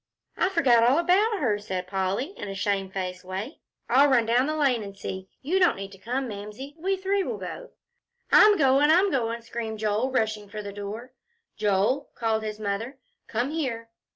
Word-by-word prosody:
"I 370 - +1
forgot 270 -11 +4
all 245 +5 +4
about 390 +6 +3
her," 215 -8 +1
said 185 -3 -4
Polly, 195 - -2
in - - -7
a 195 - -5
shamefaced 190 -2 -2
way. 190 - -6 0.3
"I'll 270 +4 +5
run 245 -4 +4
down 245 +4 +2
the 310 - -1
lane 270 -6 +2
and 200 -1 -8
see. 190 -1 -6
You 355 +8 +1
don't 360 -2 +4
need 195 0 -7
to 195 - -14
come, 255 +6 -2
Mamsie. 210 +6 -8
We 385 +3 0
three 390 +1 0
will - - -3
go." - - -7 0.6
"I'm 420 -1 +7
goin'. 275 0 +4
I'm 370 +5 +5
goin'," 235 -3 -1
screamed 230 -1 -5
Joel, 215 +4 0
rushing 220 -5 -1
for 210 0 -6
the 200 0 -7
door. 210 +5 -7 0.4
"Joel," 210 +7 +1
called 225 -2 0
his 215 -1 -5
mother, 215 +6 -3 0.3
"come 240 +5 -1
here." 235 -8 -3
230 Hz, 185 wpm, -26 LUFS, 205-280 Hz, 0.6 s, I'm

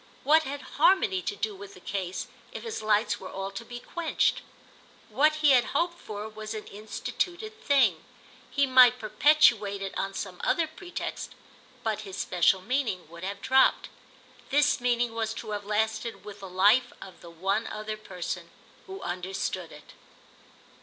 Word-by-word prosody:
What 310 +3 +6
had 285 -1 -6 0.2
harmony 290 - +4
to 205 - -3
do 210 +1 -2
with 200 +1 -11
the - - -13
case 185 -1 -4 0.3
if - - -7
his 455 - -4
lights 215 +1 +2
were 190 - -8
all 195 0 -5
to 195 +3 -7
be 240 +1 -8
quenched? 340 +5 0 0.7
What 305 +3 +4
he 290 - +7
had 250 -2 +6
hoped 345 +1 0
for 210 0 -6
was 215 0 -7
an 215 - -6
instituted 350 - -4
thing. 225 - +3 0.5
He 280 0 +2
might 255 -2 +7
perpetuate 215 -3 +4
it 195 -1 -5
on 195 0 -3
some 185 -3 -5
other 335 - +2
pretext, 350 +3 -6 0.5
but 220 -2 -1
his 195 -2 -8
special 185 +1 +2
meaning 235 - -1
would 170 +1 -10
have 200 +1 -5
dropped. 265 0 +4 0.6
This 290 -2 +3
meaning 240 -1 +1
was 225 -1 -2
to 220 - -6
have 205 -1 -4
lasted 220 +2 -1
with 205 -1 -9
the 195 -1 -8
life 205 +7 +4
of 190 - -12
the 170 - -11
one 195 +6 -1
other 215 0 -4
person 190 -5 -6 0.4
who 385 0 -8
understood 185 +2 -3
it. - - -14
215 Hz, 165 wpm, -28 LUFS, 195-265 Hz, 0.7 s, he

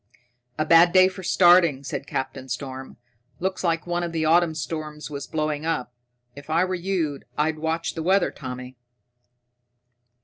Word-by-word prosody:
"A 155 - 0
bad 170 +2 +6
day 185 0 +7
for 190 0 -7
starting," 175 -6 +4
said 140 0 -5
Captain 130 0 -4
Storm. 130 +1 -6 0.4
"Looks 190 +1 -2
like 165 -2 0
one 175 0 -1
of 170 -1 -4
the 160 -1 0
autumn 165 0 +3
storms 155 -1 -5
was 140 -1 -6
blowing 155 -1 -2
up. 125 -7 -2 0.4
If 145 +1 -12
I 165 +3 +2
were 185 - -3
you, 175 -6 -2 0.2
I'd 155 +1 0
watch 160 +1 -2
the 165 - -5
weather, 190 +3 +2
Tommy." 125 -1 -8
160 Hz, 160 wpm, -24 LUFS, 145-175 Hz, 0.4 s, day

